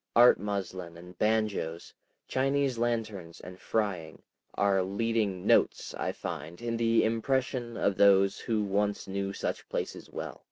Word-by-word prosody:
Art 120 +1 +7
muslin 95 -4 -4
and 90 +1 -12
banjoes, 105 -6 0 0.3
Chinese 135 -1 +1
lanterns 110 -8 -2
and 90 +1 -10
frying, 95 -8 -2 0.3
are 100 -1 +3
leading 100 -1 -1
"notes," - - +3
I - - -2
find, 85 0 -6
in 120 0 -2
the 115 0 +3
impression 120 +1 -1
of 100 -2 +1
those 100 -1 +5
who 110 -2 0
once 100 +1 0
knew 100 0 -2
such - - -4
places - - -4
well. - - -6
100 Hz, 135 wpm, -29 LUFS, 95-115 Hz, 0.3 s, Art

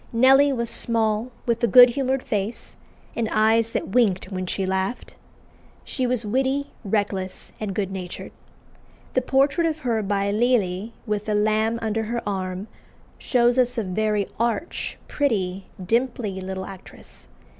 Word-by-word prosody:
Nelly 270 +4 +5
was 235 -3 -1
small, 225 0 0 0.2
with 235 0 0
a - - +5
good 245 +4 +9
humoured 265 0 -1
face, 210 +2 -3 0.4
and 225 -2 -1
"eyes 220 +1 +3
that - - -3
winked 195 -4 +1
when 185 -1 -3
she 190 +1 -2
laughed." 190 +5 -2 0.7
She 255 -3 -2
was 245 -2 -1
witty, 265 +5 0
reckless, 195 -2 -2
and 205 -3 -4
good 195 -2 -1
natured. 185 -2 -7 0.8
The 255 - +2
portrait 275 +6 +2
of 315 -1 -3
her 230 -3 0
by 200 0 0
Lely, 215 -2 +1
with 210 -2 -2
the 215 - 0
lamb 215 +2 +2
under 220 0 -1
her 235 +2 -3
arm, 190 0 -3 0.5
shows 245 -1 +2
us 245 -1 +1
a 225 - 0
very 210 +1 0
arch, 235 +7 -2
pretty, 195 -9 -1
dimply 225 -1 -1
little 190 0 -5
actress. 190 -1 -13
220 Hz, 145 wpm, -23 LUFS, 195-245 Hz, 0.8 s, good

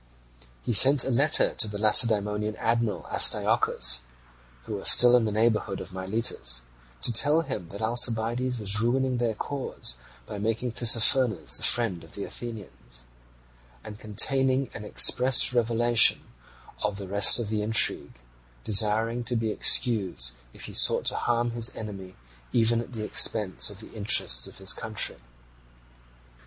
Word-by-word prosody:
He 120 - -3
sent 135 +6 +6
a 135 - -4
secret - - -2
letter 145 +4 +2
to 110 - -2
the 105 0 -8
Lacedaemonian 105 -1 +1
admiral 115 -2 -3
Astyochus, 60 0 +1 0.6
who 105 - -7
was 100 - 0
still 125 0 +6
in 120 -2 +1
the 110 - -3
neighbourhood 110 -2 -2
of 95 - -11
Miletus, 95 - -2 0.4
to 120 - 0
tell 145 +8 +2
him 120 - -7
that 100 +3 -9
Alcibiades 120 +2 0
was 105 0 +3
ruining 130 +2 -2
their 115 -2 -3
cause 130 - -4 0.3
by 105 - -9
making 115 +3 -4
Tissaphernes 115 -2 +2
the - - +1
friend 110 -9 +1
of 80 - -8
the 100 - -6
Athenians, 100 - -10 0.8
and 105 0 -12
containing 130 +5 0
an 105 - -10
express 125 +4 +3
revelation 120 -1 +2 0.6
of 105 -1 -4
the 100 -2 -8
rest 100 +1 +4
of 115 -4 -4
the 105 -1 -3
intrigue, 110 +2 0 0.5
desiring 110 +3 +1
to 125 0 -2
be 110 -1 -3
excused 95 - +2 0.2
if - - -10
he - - -11
sought - - +3
to - - -2
harm 120 0 -2
his 115 0 -3
enemy 95 -4 -10 0.4
even 115 0 0
at 120 - -12
the 110 -2 -7
expense 105 -1 +1
of 100 0 -9
the - - -15
interests 100 - +2
of - - -14
his 95 0 +1
country. 110 -2 -4
110 Hz, 150 wpm, -24 LUFS, 105-120 Hz, 0.8 s, sent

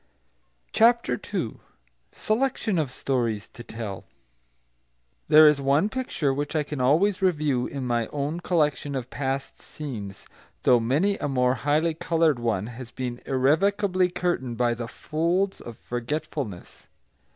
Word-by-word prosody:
CHAPTER 230 - +3
II - - -2 0.5
SELECTION 220 -4 0
OF 150 -4 0
STORIES 120 -5 -1
TO - - -12
TELL 110 -4 -6 1.2
There 155 0 +8
is 150 -2 +4
one 140 +9 +2
picture 215 - -1
which 145 +3 -3
I 155 - +2
can 150 -2 -5
always 175 +10 +3
review, 150 -9 +1
in 135 -2 -5
my 120 -2 0
own 145 +3 -3
collection 150 -5 0
of 130 -2 -4
past 135 0 -3
scenes, 110 -10 -7 0.4
though 125 -2 +5
many 150 - +1
a - - -1
more 125 -2 +2
highly 150 +4 +1
coloured 160 -3 +1
one 110 -5 0
has 120 +1 -8
been 125 -1 -5
irrevocably 180 +8 +2
curtained 175 -10 -2
by 120 0 +2
the 120 0 -5
folds 170 +9 -1
of 120 -2 -9
forgetfulness. 125 - -5
145 Hz, 135 wpm, -25 LUFS, 125-165 Hz, 1.2 s, There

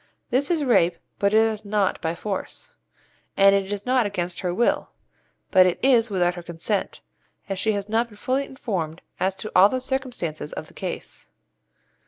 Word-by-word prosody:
This 270 +3 +1
is 330 -4 +1
rape, 175 -10 +3 0.2
but 200 0 +2
it 220 +1 +5
is 220 -1 0
not 205 -2 0
'by 165 +1 -1
force,' 210 - -5 0.6
and 195 0 +7
it 195 0 0
is 205 -1 -4
not 250 -3 +3
'against 180 -3 -3
her 180 - -1
will,' 235 +7 +1 0.6
but 185 -1 +7
it 180 - 0
is 245 -4 +4
'without 180 -3 +1
her 175 - -7
consent,' 170 +4 -3 0.5
as 195 -2 -3
she 220 +1 +1
has 200 -1 -3
not 225 +2 +1
been 210 -3 -16
fully 260 +6 0
informed 185 - -4 0.2
as 190 +1 0
to 215 +3 -7
all 190 +3 +8
the 255 - -1
circumstances 250 - -3
of - - -5
the - - -19
case. - - -6
205 Hz, 185 wpm, -24 LUFS, 180-240 Hz, 0.6 s, all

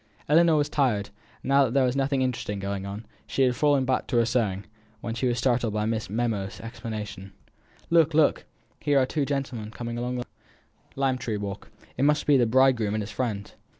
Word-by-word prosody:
Ellinor 165 +2 +5
was 145 -1 +2
tired, 125 -9 0 0.3
and - - -5
now 140 0 +5
that 125 +1 -3
there 135 - +5
was 125 +1 0
nothing 135 -1 +1
interesting 120 -5 -2
going 100 0 -4
on, 100 +3 -7 0.2
she 135 - +1
had 125 -1 +2
fallen 145 -2 +3
back 130 -1 0
to 125 - 0
her 115 - +4
sewing, 105 -5 0 0.3
when 115 +1 -4
she 125 +2 -1
was 120 -1 0
startled 120 -3 +1
by 105 0 0
Miss 110 -2 -2
Memo's 105 -3 -2
exclamation: 110 -4 -7 0.6
"Look, 165 -2 +4
look! 155 -2 +3 0.3
here 145 -1 +2
are 130 - +4
two 145 +2 -1
gentlemen 135 -6 -3
coming 120 +1 -5
along 125 +1 -2
the 120 - -4 0.7
lime 135 -2 0
tree 115 -3 -2
walk! 100 -1 -6 0.3
it 130 - 0
must 150 +1 +3
be 145 - +5
the 120 -3 +4
bridegroom 120 -4 +3
and 110 - -1
his 105 - -7
friend." 105 -6 -3
120 Hz, 205 wpm, -26 LUFS, 110-135 Hz, 0.7 s, Ellinor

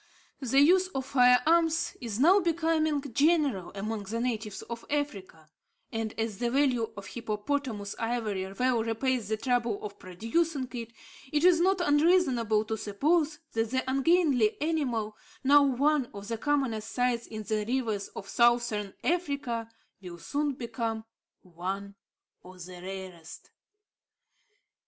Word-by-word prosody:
The 270 +1 +3
use 365 +5 +5
of 265 -1 -2
fire 250 -2 +5
arms 330 0 +2
is 230 -3 -4
now 355 +9 +6
becoming 320 -4 +1
general 285 - +2
among 210 +1 -4
the 225 +4 -3
natives 220 -4 -3
of 235 -1 -7
Africa; 200 - -4 0.4
and, 225 -1 -3
as 220 -2 -2
the 240 -1 0
value 255 -4 +1
of 200 - -7
hippopotamus 215 0 -3
ivory 215 -5 -2
well 245 +1 +1
repays 230 0 -1
the 220 - 0
trouble 235 -2 0
of 200 -1 -7
procuring 255 - -1
it, 230 -2 -6 0.4
it 300 +1 +1
is 355 -2 +6
not 380 +1 +3
unreasonable 290 - +3
to 220 0 -3
suppose 300 - +1
that 225 0 -1
the 260 +1 -1
ungainly 270 -4 +3
animal, 255 -9 -1 0.3
now 285 +2 +7
one 280 0 +2
of 200 +1 -8
the 230 - -2
commonest 255 -7 0
sights 245 -1 0
in 215 -1 -6
the 215 0 -1
rivers 225 -5 -1
of 195 - -7
Southern 235 -3 +2
Africa, 280 -9 -1 0.3
will 175 -2 -9
soon 290 - -2
become 230 -3 -4 0.4
one 190 +3 -5 0.5
of 180 -1 -11
the 180 -1 -10
rarest. 185 -3 -9
235 Hz, 140 wpm, -29 LUFS, 215-290 Hz, 0.5 s, now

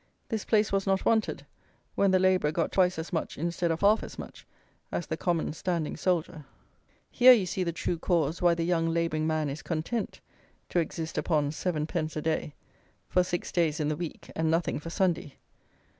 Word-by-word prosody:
This 220 -2 -2
place 215 -2 +2
was 195 0 0
not 195 0 +1
wanted, 225 -1 +1 0.5
when 200 - +3
the 190 - +4
labourer 185 -5 +3
got 165 +1 -1
twice 185 -2 +3
as 160 +2 -5
much 160 - -2
instead 170 +2 -1
of 165 0 -1
half 210 +2 +5
as - - -8
much - - -10 0.4
as 175 - -2
the 160 - -3
common 165 -2 -1
standing 170 -2 -2
soldier. 170 -3 -1 0.7
Here 255 +1 +8
you 215 -6 +2
see 185 +1 -2
the 170 - -1
true 170 0 -2
cause 165 -3 0
why 175 -1 +4
the 165 - -1
young 165 -1 +1
labouring 165 -2 0
man 155 -1 0
is 140 +2 -5
"content" 175 +7 -3 0.5
to 175 - +1
exist 160 0 -3
upon 150 -4 +1
7_d._ 155 -1 -2
a 155 - -2
day, 155 -2 -1 0.5
for 180 - +3
six 175 -1 -3
days 165 -3 +1
in 150 -1 0
the 155 - 0
week, 170 0 -7
and 160 0 +1
nothing 165 -1 0
for 165 - -7
Sunday. 170 -5 0
170 Hz, 190 wpm, -28 LUFS, 160-185 Hz, 0.7 s, Here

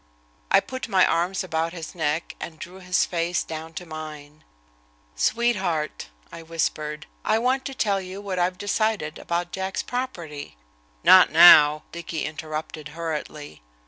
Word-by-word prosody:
I - - +6
put 260 0 -6
my 185 -1 +4
arms 175 +3 0
about 165 -1 -2
his 165 -3 -7
neck 160 -1 -2
and 160 - -7
drew 180 +4 -10
his 180 -1 +1
face 170 0 -1
down 160 0 -8
to 180 - -6
mine. 155 -2 -9 0.7
"Sweetheart," 190 - 0 0.2
I 170 - -9
whispered, 155 -2 -3 0.2
"I 215 - +2
want 255 +3 0
to 270 - -5
tell 200 -5 +1
you 185 +1 -8
what 195 -3 -4
I've 180 +1 0
decided 205 -6 -1
about 175 +1 -2
Jack's 190 0 -3
property." 170 - -5 0.5
"Not 185 -1 +8
now," 155 -2 +8
Dicky 170 -2 -4
interrupted 155 0 -6
hurriedly. 150 - -5
170 Hz, 145 wpm, -24 LUFS, 155-190 Hz, 0.7 s, Not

